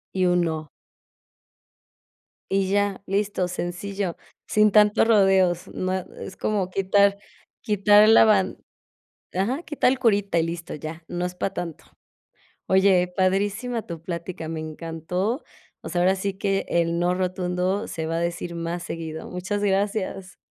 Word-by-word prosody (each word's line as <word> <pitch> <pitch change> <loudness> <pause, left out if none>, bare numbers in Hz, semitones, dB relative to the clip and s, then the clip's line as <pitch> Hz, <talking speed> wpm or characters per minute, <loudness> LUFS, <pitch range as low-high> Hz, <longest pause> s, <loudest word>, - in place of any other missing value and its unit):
Y 185 -1 +2
un 180 0 +3
no. 160 -3 -2 1.8
Y 195 -1 +1
ya, 200 -1 +1
listo, 200 -1 0
sencillo, 180 +1 -4 0.3
sin 215 -1 +4
tantos 210 +1 +5
rodeos, 190 -5 +3
no, 185 0 -2
es 190 +1 -6
como 200 -4 -1
quitar 200 +1 +3 0.4
quitar 210 0 +5
la 225 - +8
ban 200 -4 +2 0.8
ajá, 240 - -1
quitar 295 -6 +1
el 265 - 0
curita 205 -7 +2
y 165 - +3
listo, 165 +1 -4
ya, 155 +2 -7
no 175 0 -3
es 180 0 -4
para 195 +2 -3
tanto, 165 -3 -5 0.8
oye, 190 -1 +4
padrísima 205 +5 0
tu 170 -2 -7
plática, 170 -1 -5
me 160 -1 -4
encantó, 165 - -3 0.4
o - - -7
sea, 175 - 0
ahora 185 +2 +4
sí 195 +1 -2
que 195 0 -1
el 170 0 +1
no 175 +1 +2
rotundo 185 +2 -1
se 160 -1 -4
va 165 - -2
a 165 - 0
decir 170 0 -3
más 170 +1 -4
seguido, 160 -1 -6
muchas 190 +3 -3
gracias. 195 -1 -1
185 Hz, 145 wpm, -24 LUFS, 175-200 Hz, 1.8 s, la